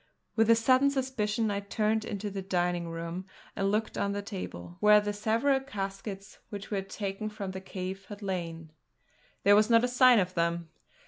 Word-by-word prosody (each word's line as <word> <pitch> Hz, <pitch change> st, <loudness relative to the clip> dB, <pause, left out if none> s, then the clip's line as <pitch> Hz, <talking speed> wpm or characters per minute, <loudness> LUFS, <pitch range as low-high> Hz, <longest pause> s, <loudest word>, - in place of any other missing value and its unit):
With 225 Hz, 0 st, +3 dB
a 230 Hz, -, +8 dB
sudden 255 Hz, +4 st, +4 dB
suspicion 230 Hz, -5 st, -1 dB
I 200 Hz, -, -1 dB
turned 215 Hz, +2 st, 0 dB
into 205 Hz, -1 st, -4 dB
the 195 Hz, 0 st, -4 dB
dining 175 Hz, -2 st, -1 dB
room 170 Hz, +3 st, -5 dB, 0.3 s
and 195 Hz, 0 st, 0 dB
looked 215 Hz, +2 st, -1 dB
on 200 Hz, 0 st, 0 dB
the 205 Hz, 0 st, -3 dB
table, 175 Hz, -, -7 dB
where 210 Hz, 0 st, +7 dB
the 205 Hz, 0 st, -2 dB
several 230 Hz, +6 st, +2 dB
caskets 195 Hz, -5 st, -6 dB
which 200 Hz, 0 st, -7 dB
we 205 Hz, -, 0 dB
had 195 Hz, 0 st, -5 dB
taken 200 Hz, +1 st, -4 dB
from 205 Hz, -3 st, -5 dB
the 190 Hz, 0 st, -6 dB
cave 190 Hz, 0 st, -6 dB
had 205 Hz, 0 st, -9 dB
lain. 165 Hz, -4 st, -4 dB, 0.7 s
There 205 Hz, 0 st, +7 dB
was 215 Hz, +2 st, +4 dB
not 230 Hz, 0 st, +5 dB
a -, -, +3 dB
sign 250 Hz, 0 st, +6 dB
of 185 Hz, -2 st, +1 dB
them! 170 Hz, -1 st, -1 dB
200 Hz, 190 wpm, -29 LUFS, 190-220 Hz, 0.7 s, a